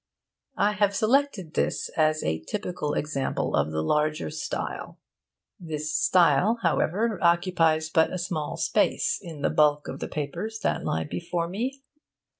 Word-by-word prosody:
I 205 +1 +3
have 205 -1 +1
selected 220 - +1
this - - -1
as 155 -1 +1
a 80 0 -1
typical 175 - -3
example 140 -3 -2
of - - +1
the 80 0 -2
larger 150 - 0
style. - - -5 0.6
This 155 -3 -4
style, 170 +6 +4
however, 195 +5 +1
occupies 170 -3 +2
but 160 0 +3
a 185 - -2
small 165 -4 -3
space 470 - +1
in 160 -6 -8
the - - +2
bulk 150 -1 +3
of - - -6
the - - -4
papers 155 +10 -4
that - - 0
lie 80 - -1
before 165 - -3
me. 255 +9 -4
165 Hz, 145 wpm, -26 LUFS, 150-200 Hz, 0.6 s, style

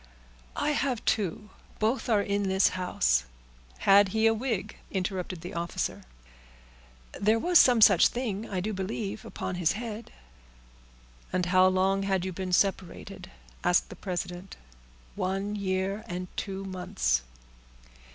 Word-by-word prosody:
"I 300 - 0
have 270 -5 -1
two—both 215 +5 -2
are 210 -3 +3
in 200 -1 -1
this 190 +1 +4
house." 65 - +1 0.5
"Had 200 +1 +6
he 220 +4 +1
a 225 - +5
wig?" 225 -3 -3
interrupted 185 -2 -3
the 175 - -7
officer. 170 0 -3 1.2
"There 215 +2 +3
was 350 +8 +5
some 245 -3 +5
such 195 -5 +7
thing 225 -4 -4
I 185 -2 -2
do 215 +3 -3
believe, 200 +2 -4
upon - - -5
his 165 - +3
head." 225 0 -6 1.2
"And 180 -1 0
how 185 +1 +5
long 190 +1 +2
had 190 -2 0
you 190 - -3
been 185 +1 -4
separated?" 190 0 -1 0.3
asked 180 0 +2
the - - -9
president. 180 0 -5 0.6
"One 195 +3 -2
year 195 +1 -2
and 180 -1 -5
two 195 0 -4
months." 185 - -1
195 Hz, 130 wpm, -28 LUFS, 185-215 Hz, 1.2 s, such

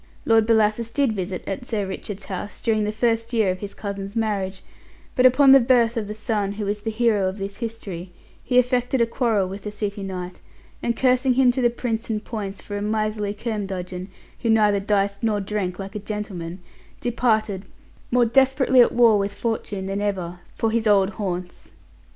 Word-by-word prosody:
Lord 225 -1 +4
Bellasis 220 0 +2
did 275 -4 +1
visit 185 -2 -4
at 195 +5 -4
Sir 220 -5 -2
Richard's 195 +1 -6
house 195 +2 -6
during 220 -3 +1
the 210 - -1
first 230 +1 0
year 220 -5 +3
of 185 - -5
his 200 0 -7
cousin's 200 0 -5
marriage; 200 -4 -1 0.5
but 255 0 +6
upon 265 +2 +6
the 270 - +9
birth 240 -2 +3
of 220 -3 -2
the 210 - -5
son 210 -2 -1
who 205 0 -4
is 205 +1 -2
the 225 - -3
hero 215 -4 +2
of 190 - -7
this 195 0 -5
history, 200 -7 -6 0.3
he 250 - +1
affected 250 +1 +2
a 235 - +4
quarrel 230 -5 +1
with 195 +2 -7
the 210 - -5
city 205 0 -4
knight, 185 -2 -6 0.4
and 235 -1 -1
cursing 255 0 +3
him 255 -1 +5
to 255 - -2
the 240 - +4
Prince 235 -1 -3
and 215 -1 -2
Poins 205 -4 -5
for 205 - -6
a 205 - -3
miserly 210 -1 -1
curmudgeon, 190 -4 -4 0.3
who 230 - -1
neither 210 -2 +4
diced 200 0 0
nor 215 -2 +1
drank 195 -3 -2
like 195 0 -7
a 210 - -4
gentleman, 195 -4 -5 0.4
departed, 220 -5 0 0.4
more 245 0 +4
desperately 265 +1 +4
at 240 - +5
war 230 -3 +5
with 200 0 -2
fortune 215 -4 -3
than 195 +1 -2
ever, 180 -4 -2 0.2
for 225 - 0
his 225 -1 +1
old 200 -1 +4
haunts. 180 -4 -5
210 Hz, 190 wpm, -23 LUFS, 195-230 Hz, 0.5 s, the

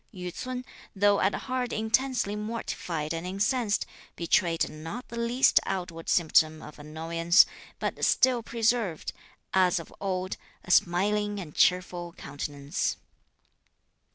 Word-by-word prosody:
Yü 180 -4 -6
ts'un, 255 0 -5 0.3
though 205 +1 +4
at 195 - +2
heart 255 -1 -3
intensely 220 -1 0
mortified 185 -7 -3
and 165 +2 -4
incensed, 210 +3 0 0.3
betrayed 170 0 +2
not 165 +11 -7
the 235 - -7
least 240 +3 +4
outward 170 -3 -4
symptom 155 -2 +3
of 150 -1 -11
annoyance, 165 +4 +3 0.3
but - - -3
still 255 -2 +4
preserved, 225 -6 0 0.4
as 185 0 +4
of 165 - -7
old, 185 -1 -2 0.3
a 180 - -5
smiling 205 +4 +2
and 160 -6 -8
cheerful 175 -1 +1
countenance. 145 -1 -3
185 Hz, 120 wpm, -28 LUFS, 165-220 Hz, 0.4 s, though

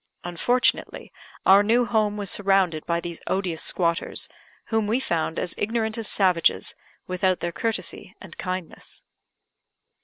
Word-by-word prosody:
Unfortunately, 240 +9 0 0.3
our 195 +1 +7
new 235 +4 +3
home 215 -3 +1
was 200 -2 -1
surrounded 195 -5 +1
by 170 0 +1
these 170 -1 -6
odious 185 -4 -1
squatters, 170 -1 +1 0.4
whom 220 -2 +1
we 230 +4 +1
found 165 -9 -2
as 180 - -2
ignorant 220 0 -1
as 225 -3 -2
savages, 180 -4 +2 0.3
without 185 0 0
their 170 - -2
courtesy 220 +8 -3
and - - -11
kindness. 185 -2 -6
190 Hz, 130 wpm, -24 LUFS, 175-220 Hz, 0.4 s, our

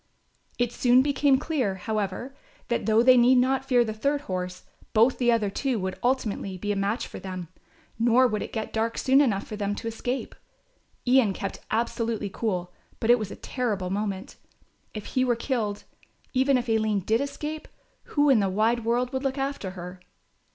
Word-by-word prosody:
It 245 -1 0
soon 250 +1 +4
became 280 -1 +3
clear, 260 -10 -1
however, 215 +5 -3 0.4
that, 235 -3 -1
though 220 +1 +4
they 255 0 +7
need 245 +2 +6
not 260 +1 +2
fear 250 -3 +3
the 220 - -3
third 280 +6 0
horse, 180 -5 -4 0.3
both 230 +4 +4
the 240 -1 +4
other 215 -4 +1
two 260 +3 -1
would 190 -2 -4
ultimately 220 -6 -1
be 205 +3 -2
a - - 0
match 200 +4 -1
for - - -9
them, 185 -3 -6 0.5
nor 240 +2 +5
would 215 -4 0
it - - -5
get 220 -1 -4
dark 225 +1 -1
soon 270 +2 +4
enough 215 -8 +1
for 215 - -6
them 205 -1 -2
to 230 - -6
escape. 245 +3 -3 0.7
Ian 250 -5 +4
kept 195 0 -5
absolutely 230 -2 -1
cool, 180 -6 -2 0.3
but 230 - +3
it 245 - +5
was 215 -3 -4
a - - -7
terrible 205 -8 -3
moment. 200 -1 -3 0.6
If 215 - -6
he 255 - +3
were 245 -2 +2
killed, 225 -4 -2 0.5
even 265 +1 +3
if 245 0 -3
Aline 220 -3 +1
did 220 +6 +1
escape, 300 +2 -5 0.4
who 290 0 +2
in 250 - +5
the 195 -2 +1
wide 220 +4 +1
world 245 +2 0
would 265 +1 -2
look 270 0 -1
after 270 -7 -2
her? 180 +1 -8
230 Hz, 185 wpm, -26 LUFS, 205-255 Hz, 0.7 s, they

